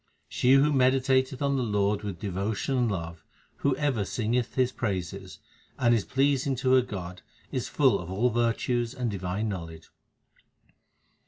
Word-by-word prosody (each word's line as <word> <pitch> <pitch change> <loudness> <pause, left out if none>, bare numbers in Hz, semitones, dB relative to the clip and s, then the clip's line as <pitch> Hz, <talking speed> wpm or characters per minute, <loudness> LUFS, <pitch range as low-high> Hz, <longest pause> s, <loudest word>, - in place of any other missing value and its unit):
She 125 +1 +2
who 145 +2 +5
meditateth 130 0 +2
on 140 -1 +1
the - - 0
Lord 105 -3 0
with 100 -4 -5
devotion 100 +6 -2
and 125 -2 +2
love, 85 -3 -5 0.3
who 140 -2 +1
ever 135 -7 0
singeth 120 +3 -1
His 130 -1 +2
praises, 95 -4 -4 0.4
And 120 -2 +3
is 110 -4 +1
pleasing 135 0 +1
to 130 +1 +1
her 130 - +6
God, 90 -6 -7 0.3
is - - -2
full - - +3
of 85 - -8
all 110 +7 +1
virtues 120 +1 0
and 125 -3 -2
divine 95 +2 -3
knowledge. 85 -5 -7
115 Hz, 155 wpm, -27 LUFS, 95-130 Hz, 0.4 s, her